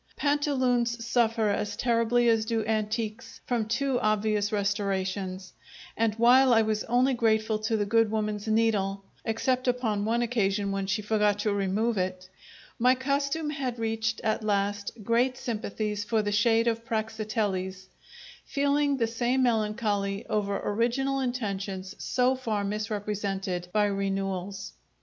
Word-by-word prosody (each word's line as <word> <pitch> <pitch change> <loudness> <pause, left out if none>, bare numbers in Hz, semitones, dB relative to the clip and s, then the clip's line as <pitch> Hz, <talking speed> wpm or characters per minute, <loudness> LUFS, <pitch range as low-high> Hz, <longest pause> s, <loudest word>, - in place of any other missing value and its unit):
Pantaloons 255 -5 +1
suffer 225 -2 +2
as 205 0 -1
terribly 240 +1 +2
as 225 -1 +3
do 225 -1 -1
antiques 215 0 -2
from 235 -3 -1
too 260 +2 0
obvious 215 -1 +1
restorations; 195 -2 -2 0.4
and 225 -1 +1
while 245 +2 +6
I 225 - +5
was 215 -1 -1
only 250 +3 +2
grateful 220 -2 +1
to 220 +1 0
the 205 - 0
good 225 +1 +3
woman's 215 -1 -2
needle 210 -3 +1 0.2
(except 255 +3 0
upon 230 -5 0
one 230 +3 +1
occasion 205 -4 0
when 195 -1 -2
she 210 +2 -1
forgot 210 -1 +2
to 210 -1 +1
remove 200 +3 0
it), 185 0 -3 0.5
my 250 +2 +5
costume 280 +3 -1
had 260 -4 -3
reached, 225 0 -1
at 220 0 0
last, 205 -1 0
great 245 +4 +2
sympathies 210 -3 -3
for 220 0 0
the 205 - -1
shade 225 +2 +3
of 230 0 0
Praxiteles, 215 -4 -2 0.6
feeling 285 0 +1
the 235 - +2
same 240 +3 0
melancholy 210 -3 0
over 200 -2 -1
original 245 +6 0
intentions 200 -6 -3
so 250 0 +2
far 225 -6 -2
misrepresented 200 -3 -3
by 210 +2 +3
renewals. 195 -1 -3
220 Hz, 135 wpm, -27 LUFS, 205-235 Hz, 0.6 s, while